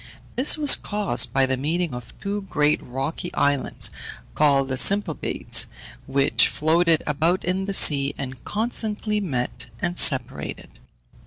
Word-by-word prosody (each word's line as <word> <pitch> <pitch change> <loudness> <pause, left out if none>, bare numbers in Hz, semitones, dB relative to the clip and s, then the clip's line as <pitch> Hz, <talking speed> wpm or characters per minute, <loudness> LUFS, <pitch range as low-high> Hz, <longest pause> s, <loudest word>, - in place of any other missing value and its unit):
This 260 +5 +5
was 295 -2 +5
caused 205 - -1
by 135 +2 +2
the 130 0 -1
meeting 160 +3 -2
of 125 -1 -10
two 205 +1 -4
great 150 -1 +1
rocky 135 +7 -6
islands, 145 -1 0 0.4
called 140 -3 +2
the 130 - -2
Symplegades, 195 +3 +2 0.4
which 135 +1 +2
floated 165 +1 +1
about 165 +5 -1
in 185 +2 -2
the 200 - -4
sea, 140 -4 +4
and 130 -2 -8
constantly 215 -1 -2
met 130 -13 -4
and 175 +1 -2
separated. 130 - +1
155 Hz, 135 wpm, -22 LUFS, 135-195 Hz, 0.4 s, This